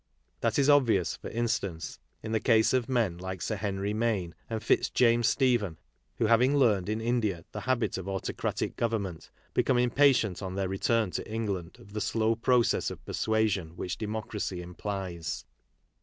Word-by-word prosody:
That - - 0
is 140 -1 +3
obvious, 120 - +4
for - - -8
instance, 100 -8 -2 0.2
in 110 - -4
the 110 - +2
case 110 +1 +4
of 130 -1 +1
men 110 -9 +1
like 95 0 -5
Sir 110 - -2
Henry 100 0 -2
Maine 105 -6 0 0.2
and 110 -2 -3
Fitzjames 120 0 +3
Stephen, 120 - +2 0.4
who, - - +2
having 125 +6 +4
learned 105 -8 +3
in 110 +1 -1
India 110 -7 -1
the - - -5
habit 120 -6 +1
of 95 +1 -6
autocratic 95 -1 -2
government, 100 -8 -2 0.2
become 130 - +2
impatient 125 -5 +3
on 95 -1 -4
their 95 -1 0
return 105 +2 +1
to - - -5
England 100 -7 -3
of 100 - -15
the 105 - -2
slow 110 +1 +1
process 120 +1 +2
of - - -9
persuasion 105 -7 0
which 90 0 -4
democracy 105 -3 -3
implies. 90 -2 -5
110 Hz, 160 wpm, -29 LUFS, 95-115 Hz, 0.4 s, obvious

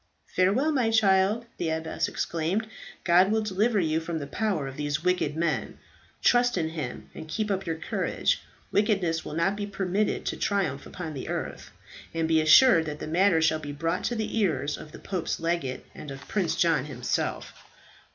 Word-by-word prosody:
"Farewell, 210 +12 +3
my 255 -6 +2
child," 210 0 +3
the 170 - -1
abbess 160 0 -1
exclaimed. 170 +7 -1 0.4
"God 180 +3 +5
will 220 0 +2
deliver 215 +2 +1
you 160 -2 +1
from 165 0 -4
the 145 - -4
power 185 -2 -1
of 135 - -7
these 145 +2 -2
wicked 180 -5 +1
men. 165 -2 -1 0.5
Trust 245 -3 +4
in 160 -2 0
Him, 155 -7 -6
and 160 - -8
keep 215 +5 -2
up 195 -1 -2
your 165 - 0
courage. 160 - -1 0.3
Wickedness 195 -6 +1
will 150 - -6
not 170 +5 +1
be 205 0 -4
permitted 200 +1 -1
to - - -2
triumph 185 -10 -1
upon 165 -4 -6
the 135 - -6
earth; - - -4 0.5
and 165 -1 +1
be 160 -1 +4
assured 165 +1 +7
that 150 -1 -4
the - - -6
matter 170 +1 +3
shall 155 0 +3
be 145 -2 -6
brought 165 +5 -2
to 240 - 0
the 220 0 -2
ears 150 -7 0
of 155 - -11
the - - -10
pope's 185 -4 -3
legate, 165 -6 -2
and 150 - -9
of 135 0 -9
Prince 175 -6 0
John 165 -5 +2
himself." 125 -4 -2
170 Hz, 185 wpm, -27 LUFS, 155-200 Hz, 0.5 s, assured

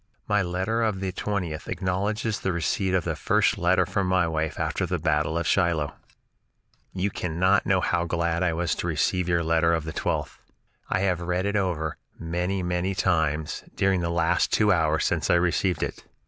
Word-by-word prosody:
My 105 0 +2
letter 95 +6 -1
of 110 -4 0
the 95 -1 -2
20th 90 -5 -3
acknowledges 100 +4 -1
the 95 - -1
receipt 90 +3 0
of 90 - +1
the - - -2
first - - +2
letter - - +3
from 95 -2 -1
my 90 -2 +2
wife 80 -1 -2
after - - -1
the - - -1
battle 75 0 0
of 85 - -1
Shiloh: 85 -4 +1 1.0
"You 95 +2 -1
cannot 90 +4 +1
know 95 -1 +3
how 85 -1 0
glad 85 0 -1
I 90 -2 +2
was 85 +1 0
to - - -3
receive 90 +3 0
your 85 -1 +2
letter 85 +1 +3
of 80 - -2
the 80 0 -6
12th. - - -2 0.5
I 95 - +1
have 90 -3 +1
read 90 +2 -1
it 100 +1 -1
over 85 -6 -1 0.2
many, 90 +3 -2
many 90 +2 -1
times 80 -5 0
during 95 -2 +2
the 85 - -1
last 85 -1 +1
two 105 -1 +3
hours 80 -3 +2
since - - 0
I - - +5
received 90 0 +1
it. - - -5
90 Hz, 190 wpm, -25 LUFS, 80-95 Hz, 1.0 s, I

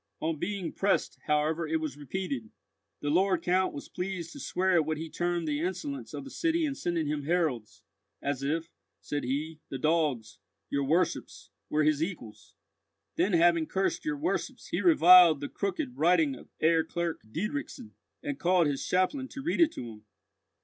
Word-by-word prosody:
On 160 -1 -2
being 200 -2 -3
pressed, 195 0 0
however, 155 +2 +1
it 160 +1 0
was 155 -4 -4
repeated: 145 - -4 0.5
"The 145 - -1
Lord 185 +4 +2
Count 185 +1 +2
was 140 - -8
pleased 180 -2 -4
to - - -10
swear 185 +1 0
at 170 -3 +4
what 155 -1 -1
he 160 +1 -6
termed 175 -1 -1
the 150 0 -1
insolence 235 - -4
of - - -5
the 275 - -10
city 330 -1 +1
in 285 - -1
sending 175 - -1
him 150 0 -1
heralds, 155 -10 -1 0.4
'as 140 -1 -2
if,' 160 +4 -2 0.3
said 145 - -4
he, 150 +5 -3
'the 135 - -4
dogs,' 150 -6 0 0.3
your 140 -1 0
worships, 165 +6 -1 0.2
'were 155 0 +2
his 155 -1 +2
equals.' 160 - -6 0.6
Then 185 +3 +1
having 170 -1 +4
cursed 190 0 -1
your 310 -1 -2
worships, 320 +5 -3
he - - -1
reviled 180 - +8
the 145 - -5
crooked 250 +6 -3
writing 160 -3 +3
of 130 - -12
Herr 160 0 +4
Clerk 170 0 -3
Diedrichson, 225 - -4 0.3
and 285 -1 -4
called 180 -1 +3
his 145 -2 -1
chaplain 185 +9 0
to 270 0 -8
read 340 +2 0
it 325 -1 +5
to 120 - -6
him. 105 -2 -11
170 Hz, 175 wpm, -29 LUFS, 150-190 Hz, 0.6 s, reviled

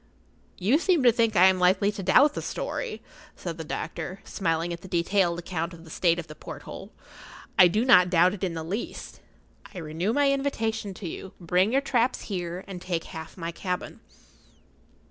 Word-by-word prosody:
"You 220 - +3
seem 345 -5 +2
to 245 - +7
think 230 -1 +1
I 185 - +7
am 190 -1 +4
likely 190 +3 +3
to 205 - -6
doubt 255 +11 +5
the - - -4
story," - - -4 0.3
said 170 -2 -6
the - - -3
doctor, 165 +4 -5
smiling 165 -1 -1
at 170 - -8
the 190 - -10
detailed 175 0 +1
account 170 -1 -4
of 165 - -14
the 160 - -13
state 170 0 +2
of 175 - -4
the 155 - -10
porthole. - - -9 0.6
"I 180 - +8
do 215 +7 +1
not 180 -8 +6
doubt 180 +1 +4
it 205 - -7
in 175 -3 -1
the 160 - -4
least. 195 +8 -5 0.6
I - - -7
renew 165 +4 -2
my 280 +2 +3
invitation 225 -7 -2
to 185 - -6
you. 185 +3 -7
Bring 180 +4 +2
your 270 +2 +3
traps 250 -3 +1
here, 180 -2 -4
and 185 -3 -7
take 175 -3 -2
half 160 0 -9
my 170 -1 -4
cabin." 180 +1 -4
185 Hz, 190 wpm, -26 LUFS, 170-220 Hz, 0.6 s, I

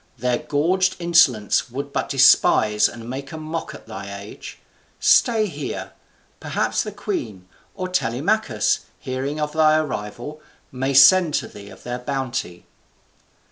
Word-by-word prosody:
Their 125 0 0
gorged 170 +6 +1
insolence 160 -10 +3
would 140 +3 -6
but - - -2
despise 115 -5 +4
and 115 -1 -10
make 135 +2 -6
a 160 - -7
mock 155 +1 -5
at - - -13
thy - - -8
age. - - -10 0.4
Stay 225 -3 +4
here. - - -6 0.5
Perhaps - - -1
the 210 - -5
queen, 125 - -5 0.3
or 185 -2 -4
Telemachus, 140 - 0 0.2
hearing 135 +4 -4
of 150 0 -2
thy 155 -1 +4
arrival, 130 +1 -5 0.3
may 135 +1 -2
send 155 +4 +6
to - - -1
thee 100 -1 -12
of 95 - -15
their 125 0 -4
bounty." 125 -9 -4
140 Hz, 140 wpm, -22 LUFS, 120-165 Hz, 0.5 s, send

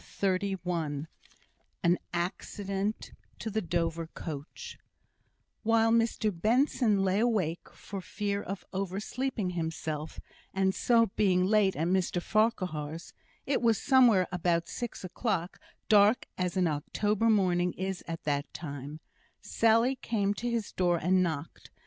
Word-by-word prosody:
CHAPTER 190 -2 +2 0.2
XXXI 160 -5 -3 0.8
An 175 +1 +3
Accident 195 +4 -3 0.3
to 220 - -5
the 220 +2 0
Dover 165 -2 -1
Coach 155 -2 -8 0.8
While 225 0 +3
Mr 230 -2 +2
Benson 215 - +2
lay 190 +1 +2
awake 205 -8 0
for 195 -1 -8
fear 200 +2 -2
of 195 -1 -6
oversleeping 195 +3 -2
himself, 160 -2 -4 0.4
and 190 0 +2
so 230 -2 +3
being 185 -3 +3
late 205 -1 +3
at 160 - -1
Mr 185 -1 +1
Farquhar's 175 -7 -1 0.3
(it 275 - 0
was 230 -3 +3
somewhere 245 -9 +5
about 170 -1 0
six 240 -4 -5
o'clock 185 -1 -2 0.3
dark 210 +2 +5
as 180 +1 -2
an 185 - +3
October 205 +8 0
morning 180 -4 +3
is 190 0 -4
at 165 -1 -5
that 145 -1 -1
time), 145 -1 -7 0.4
Sally 230 +3 +3
came 205 -4 0
to 240 +4 -3
his 230 -3 -2
door 175 -2 +2
and 185 +3 +2
knocked. 160 -3 -4
190 Hz, 130 wpm, -30 LUFS, 170-215 Hz, 0.8 s, somewhere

